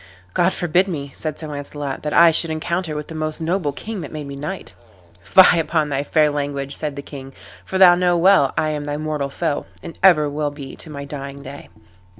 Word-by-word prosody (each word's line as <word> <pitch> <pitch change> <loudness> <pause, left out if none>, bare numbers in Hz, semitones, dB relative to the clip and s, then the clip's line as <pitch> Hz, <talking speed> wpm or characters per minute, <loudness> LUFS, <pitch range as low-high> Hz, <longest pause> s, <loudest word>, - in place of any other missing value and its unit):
"God 175 +2 +3
forbid 175 +2 +1
me," 140 -6 -5
said 155 -2 -5
Sir 155 - -7
Launcelot, 145 -1 -5
"that 150 - -3
I 170 +1 +7
should 165 +1 +2
encounter 160 +1 -2
with 150 0 -5
the - - -9
most 155 0 -3
noble 165 -2 -1
king 210 +7 -6
that - - -8
made 150 -2 -6
me 140 0 -7
knight." 150 +7 -6 0.5
"Fie 180 - +6
upon 155 -2 0
thy 140 -1 -1
fair 150 +1 +2
language," 140 -1 -3
said 150 -2 -3
the 140 - -7
king, 135 -2 -10 0.3
"for 190 - -3
know 180 -2 +8
thou 175 -1 +2
well 170 -5 +4
I 155 - +1
am 150 -1 -3
thy 145 0 -3
mortal 150 -2 -3
foe, 150 +1 -2 0.2
and 165 - -9
ever 170 -6 +5
will 145 +1 -2
be 145 -2 -9
to - - -6
my 140 -2 -7
dying 140 -1 -7
day." 140 +2 -10
150 Hz, 215 wpm, -20 LUFS, 145-170 Hz, 0.5 s, know